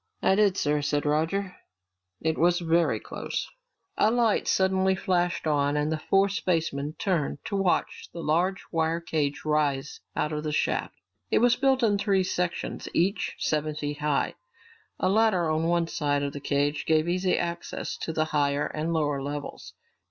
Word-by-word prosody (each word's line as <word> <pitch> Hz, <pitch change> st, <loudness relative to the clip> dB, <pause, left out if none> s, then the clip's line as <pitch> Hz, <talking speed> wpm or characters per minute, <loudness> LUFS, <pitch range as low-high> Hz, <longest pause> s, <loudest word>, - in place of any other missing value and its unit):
"I -, -, +4 dB
did, 200 Hz, -1 st, +3 dB
sir," 150 Hz, 0 st, +1 dB
said 145 Hz, +1 st, 0 dB
Roger. 165 Hz, +6 st, 0 dB, 0.6 s
"It 160 Hz, 0 st, 0 dB
was 175 Hz, +2 st, +3 dB
very 170 Hz, -1 st, +2 dB
close." -, -, -4 dB, 0.5 s
A 210 Hz, -, +5 dB
light 230 Hz, -2 st, +2 dB
suddenly 190 Hz, 0 st, +2 dB
flashed 180 Hz, -2 st, 0 dB
on 145 Hz, -1 st, +1 dB
and 150 Hz, +1 st, 0 dB
the 160 Hz, -, -1 dB
four 195 Hz, +5 st, +3 dB
spacemen 165 Hz, -6 st, -1 dB
turned 170 Hz, -9 st, -1 dB
to 200 Hz, -, -3 dB
watch 195 Hz, -2 st, 0 dB
a -, -, -11 dB
large 170 Hz, +4 st, 0 dB
wire 165 Hz, 0 st, +1 dB
cage 150 Hz, -4 st, -2 dB
rise 150 Hz, -2 st, 0 dB, 0.2 s
out 150 Hz, +1 st, -1 dB
of 150 Hz, 0 st, -3 dB
the 155 Hz, -, -2 dB
shaft. 150 Hz, -, -1 dB, 0.3 s
It -, -, +2 dB
was 245 Hz, 0 st, +4 dB
built 265 Hz, -1 st, +2 dB
in 205 Hz, -3 st, +3 dB
three 195 Hz, -2 st, +2 dB
sections, 180 Hz, -1 st, -3 dB
each 190 Hz, +5 st, +1 dB
seven 155 Hz, 0 st, -1 dB
feet 145 Hz, 0 st, -4 dB
high. 150 Hz, -1 st, 0 dB, 0.7 s
A -, -, +1 dB
ladder 195 Hz, -4 st, +3 dB
on 160 Hz, +1 st, 0 dB
one 170 Hz, 0 st, +2 dB
side 145 Hz, -3 st, -1 dB
of 140 Hz, 0 st, -3 dB
the 145 Hz, -, -6 dB
cage 145 Hz, +1 st, 0 dB
gave 155 Hz, 0 st, +3 dB
easy 180 Hz, +1 st, +1 dB
access 170 Hz, 0 st, -3 dB
to -, -, -4 dB
the 155 Hz, -1 st, 0 dB
higher 145 Hz, -2 st, +1 dB
and 155 Hz, +2 st, -3 dB
lower 145 Hz, -3 st, 0 dB
levels. 145 Hz, +1 st, -6 dB
160 Hz, 170 wpm, -27 LUFS, 150-185 Hz, 0.7 s, A